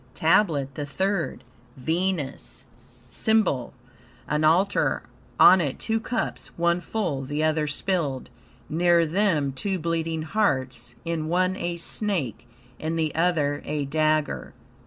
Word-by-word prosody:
TABLET 155 -5 +2
THE 145 0 -5
THIRD 190 +4 -1 0.3
Venus 160 -5 -2 0.5
SYMBOL 210 - +1 0.6
An 150 +1 0
altar: 180 +6 +2 0.4
on 185 0 +8
it 140 -5 -2
two 225 0 -1
cups, 225 +1 -3
one 170 +1 +2
full, 175 -10 -2
the 145 +3 -2
other 155 -1 +1
spilled; 145 -3 -2 0.4
near 170 +1 +3
them 165 -5 +1
two 190 +8 -2
bleeding 165 -1 -2
hearts, 130 - -1
in 165 -2 -2
one 185 +2 +1
a 175 -1 -3
snake, 165 - -2 0.3
in 160 +1 -2
the 160 -2 0
other 155 -4 +1
a 150 -1 -2
dagger. 155 +1 0
160 Hz, 120 wpm, -25 LUFS, 145-180 Hz, 0.6 s, on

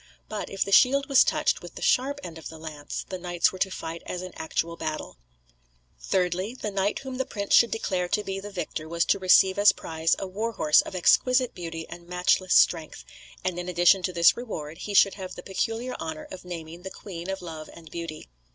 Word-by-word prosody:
But 215 - -5
if 195 - -1
the 195 - -5
shield 275 +6 +5
was 275 -2 +6
touched - - +1
with - - -11
the - - -8
sharp 280 +3 +2
end 165 -1 -8
of - - -8
the 160 - -10
lance, 155 -2 -6
the 185 - -5
knights 175 -1 +1
were 185 - -10
to 190 - +1
fight 165 -2 -6
as 180 0 -4
in 185 - -8
actual 165 +1 -2
battle. 155 - -5 0.8
Thirdly: 185 - -1
The 215 -5 -4
knight 195 +1 0
whom 265 -1 -6
the 265 - +1
prince 200 -2 -3
should 235 - +7
declare 185 -5 -1
to 210 +3 0
be 195 -1 -4
the 205 +1 -7
victor 170 -5 -5
was 170 +1 +1
to - - +2
receive 190 +1 +5
as 205 0 +7
prize 160 0 -1
a - - -4
war 215 +5 -3
horse 150 -6 +5
of - - -8
exquisite 250 +7 +3
beauty 165 -2 -6
and 175 0 -11
matchless 180 +1 +2
strength, 165 -3 +3 0.4
and 180 -1 -2
in 180 0 -4
addition 175 +2 +4
to 185 - -1
this 170 -1 +5
reward, 165 -10 -6
he 205 - -5
should 195 0 +6
have 185 -2 -7
the 180 - -9
peculiar 225 +6 -2
honour 160 -1 -5
of 185 - -9
naming 170 -1 -7
the 190 - -6
Queen 180 -2 -8
of 195 -1 -4
Love 160 -2 -8
and 160 -2 -14
Beauty. 165 -2 -6
180 Hz, 220 wpm, -26 LUFS, 170-200 Hz, 0.8 s, should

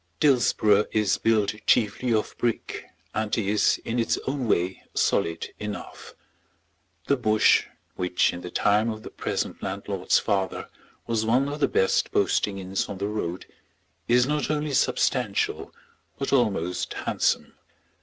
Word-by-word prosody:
Dillsborough 110 -7 +4
is 105 -2 +1
built 110 -3 +2
chiefly 115 +3 +2
of 110 -2 0
brick, 120 -2 -2 0.3
and 110 -1 -1
is, 105 -1 +2
in 120 +2 -1
its 115 - +1
own 135 -2 -2
way, 90 -2 0
solid 80 0 0
enough. 105 -1 -7 0.9
The 140 - +3
Bush, 110 -4 +3 0.3
which 90 0 +1
in 90 - -7
the 90 - -7
time 105 +5 +2
of 110 -1 -5
the - - -9
present - - -3
landlord's 95 -1 0
father 95 -3 -1 0.4
was 115 -2 0
one 125 +5 +2
of 145 +1 -4
the - - +3
best 95 - +1
posting 100 -1 +1
inns 95 0 -3
on 100 - -5
the 100 - -2
road, 95 -4 -4 0.6
is 125 +1 +4
not 150 +2 -1
only 150 -1 -1
substantial, - - 0 0.5
but 135 0 -2
almost 95 -9 0
handsome. - - 0
110 Hz, 140 wpm, -25 LUFS, 100-120 Hz, 0.9 s, Dillsborough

